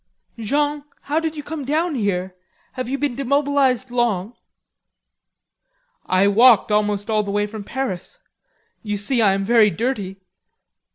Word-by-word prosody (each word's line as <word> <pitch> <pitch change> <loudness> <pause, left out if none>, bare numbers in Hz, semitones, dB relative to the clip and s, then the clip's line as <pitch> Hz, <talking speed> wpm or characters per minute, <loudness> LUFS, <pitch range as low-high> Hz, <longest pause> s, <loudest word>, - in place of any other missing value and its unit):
"Jean, 290 +5 0 0.2
how 300 +3 -1
did 320 -1 -3
you 295 - -5
come 305 -1 -6
down 315 +5 0
here? 190 -6 -2 0.4
Have 255 -2 -5
you 275 - -1
been 285 -2 -1
demobilized 275 -2 +1
long?"' 230 -4 0 1.7
"I 185 +1 +3
walked 225 +1 +5
almost 210 -1 0
all 215 -1 +1
the 205 - -6
way 205 +1 0
from 210 0 -8
Paris. 255 - -5 0.6
You 210 -2 -3
see, 230 +4 +1
I 200 -3 +4
am 195 0 -2
very 225 -1 +5
dirty." 205 -4 -3
235 Hz, 145 wpm, -21 LUFS, 205-275 Hz, 1.7 s, walked